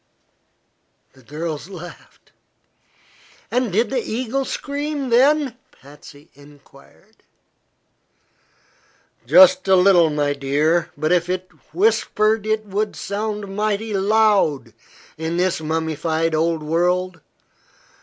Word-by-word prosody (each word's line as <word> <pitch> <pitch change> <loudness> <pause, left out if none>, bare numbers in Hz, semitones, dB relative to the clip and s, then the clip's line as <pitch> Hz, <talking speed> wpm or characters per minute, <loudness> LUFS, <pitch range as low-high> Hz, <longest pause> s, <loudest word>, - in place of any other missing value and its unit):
The 130 - -20
girls 155 +5 -6
laughed. 175 -2 -13 1.2
"And 250 -3 0
did 225 +8 0
the 260 - 0
eagle 255 +4 -3
scream, 285 0 -4
then?" 265 +1 +3
Patsy 145 +2 -17
enquired. 145 +8 -20 2.1
"Just 280 -3 +6
a 190 - +5
little, 180 -3 +5
my 145 -1 0
dear; 150 +5 0
but 155 +2 -1
if 175 -1 +1
it 185 0 -3 0.2
whispered 215 +3 +1
it 215 0 -1
would 205 +1 -3
sound 205 -1 -5
mighty 215 +1 -2
loud 200 -6 +1 0.5
in 160 +1 -3
this 180 -2 0
mummified 160 +1 -2
old 160 0 0
world. 175 +2 -1
185 Hz, 100 wpm, -20 LUFS, 160-220 Hz, 2.1 s, Just